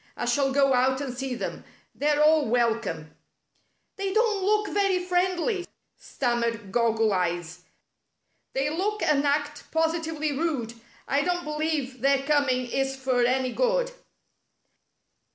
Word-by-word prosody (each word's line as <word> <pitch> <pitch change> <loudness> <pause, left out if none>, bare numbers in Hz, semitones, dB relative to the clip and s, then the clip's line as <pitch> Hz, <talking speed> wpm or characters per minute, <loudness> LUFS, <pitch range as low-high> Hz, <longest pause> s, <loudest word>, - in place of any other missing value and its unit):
I - - -2
shall 275 -2 +1
go 275 0 +3
out 260 +1 +2
and 270 -3 -4
see 260 0 -3
them. - - -5 0.3
They're 295 +1 +2
all 310 -1 +4
welcome." 220 -10 0 0.4
" - - -45
They 390 -1 -2
don't 430 -2 +1
look 420 +1 +2
very 395 -2 +2
friendly," 365 +2 0 0.3
stammered 235 -5 -2
Croggle 225 -2 +2
Eyes. 175 -1 -2 0.4
" - - -49
They 270 +2 0
look 415 +6 -1
and 290 -2 +2
act 290 +1 -1
positively 320 -1 0
rude. 275 -7 -2 0.3
I 280 +1 +2
don't 355 +3 -1
believe 300 -4 -2
their 275 0 +3
coming 280 -4 +2
is 270 0 0
for 260 -2 0
any 255 +1 +1
good." - - +1
280 Hz, 135 wpm, -26 LUFS, 245-335 Hz, 0.4 s, all